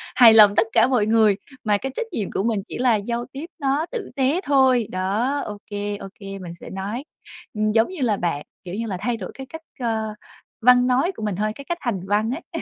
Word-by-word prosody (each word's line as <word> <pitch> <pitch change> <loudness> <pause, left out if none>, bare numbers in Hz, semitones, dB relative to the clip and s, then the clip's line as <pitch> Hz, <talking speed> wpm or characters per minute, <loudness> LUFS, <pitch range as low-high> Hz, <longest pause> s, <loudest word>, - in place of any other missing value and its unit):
hài 235 -3 +9
lòng 210 -2 +8
tất 225 - +4
cả - - +5
mọi 245 -5 +2
người, 215 -2 +4 0.3
mà 210 -2 +2
cái 270 +6 -4
trách 475 - -2
nhiệm 215 - -3
của - - -1
mình 220 -3 0
chỉ - - -6
là 245 -2 +3
giao 235 +3 -2
tiếp 280 +4 -6
nó 280 +2 +1
tử 475 -5 -5
tế 280 +6 +1
thôi. 260 - +3
Đó, 210 +10 0
ô 210 - -6
kê, 205 0 -3
ô 195 - -8
kê 195 -1 -7
mình 175 -2 -7
sẽ - - -10
nói. 200 +7 -4 0.5
Ừm, 215 -1 0
giống 225 +1 +3
như 370 -5 -7
là 220 -5 +2
bạn 165 -5 -2 0.2
kiểu 180 0 -6
như 230 +2 -3
là, 190 - -3
thay 230 +4 -1
đổi 190 -4 -7
cái 265 - -8
cách, 320 +4 -9 0.2
ơ, 220 -3 -1 0.5
văn 250 +1 +6
nói 260 +8 +2
của - - -7
mình 210 -3 -1
thôi, 215 +3 -1
cái 280 - -10
cách 345 - -1
hành 235 -7 -1
văn 210 +3 +1
ấy. 330 +4 -5
225 Hz, 245 wpm, -23 LUFS, 205-260 Hz, 0.5 s, hài